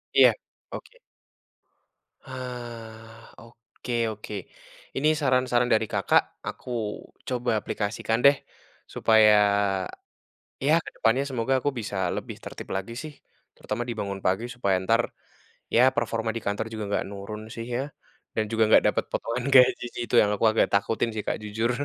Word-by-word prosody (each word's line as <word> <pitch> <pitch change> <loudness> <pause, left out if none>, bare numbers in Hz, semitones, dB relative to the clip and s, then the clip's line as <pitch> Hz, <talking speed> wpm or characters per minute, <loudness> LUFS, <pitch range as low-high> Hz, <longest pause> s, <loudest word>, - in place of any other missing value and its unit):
Iya. - - +8 0.4
Oke. - - -9 1.3
Hah, 115 -3 -9
oke 115 +1 -10 0.2
oke. 105 0 -8 0.6
Ini, 140 +3 +1
saran-saran 125 -3 +2
dari 110 0 +3
Kakak, - - +3 0.3
aku - - -7 0.6
coba 125 -1 -2
aplikasikan 110 +2 -2
deh. 140 0 +8 0.6
Supaya, 110 -1 +5 1.3
ya, 155 - +5
kedepannya 120 +5 +1
semoga 130 0 0
aku 145 - 0
bisa 105 -2 -5 0.2
lebih - - -6
tertib - - -8
lagi, 95 +4 -4
sih. 155 -1 -7 0.4
Terutama, 105 +3 -4
dibangun 100 -4 -4
pagi, 95 +5 +1
supaya, 100 -6 +1
entar, 115 +5 +2 0.7
ya 120 - +6
performa 115 -1 -1
di 115 - -3
kantor 100 +2 -1
juga 110 -1 -4
nggak 100 - 0
nurun 100 +2 -7
sih, 115 - -5
ya. 130 - 0 0.5
Dan, 110 - +2
juga, 115 0 +3
nggak - - +6
dapat - - +1
potongan 120 +2 -2
gaji, 125 -2 +6
sih. - - -5
Itu, - - 0
yang 105 - +2
aku 115 - 0
agak 110 - +3
takutin 110 +3 +1
sih, 105 -1 -3
Kak, - - 0
jujur. 110 +3 -1
115 Hz, 145 wpm, -26 LUFS, 105-125 Hz, 1.3 s, Iya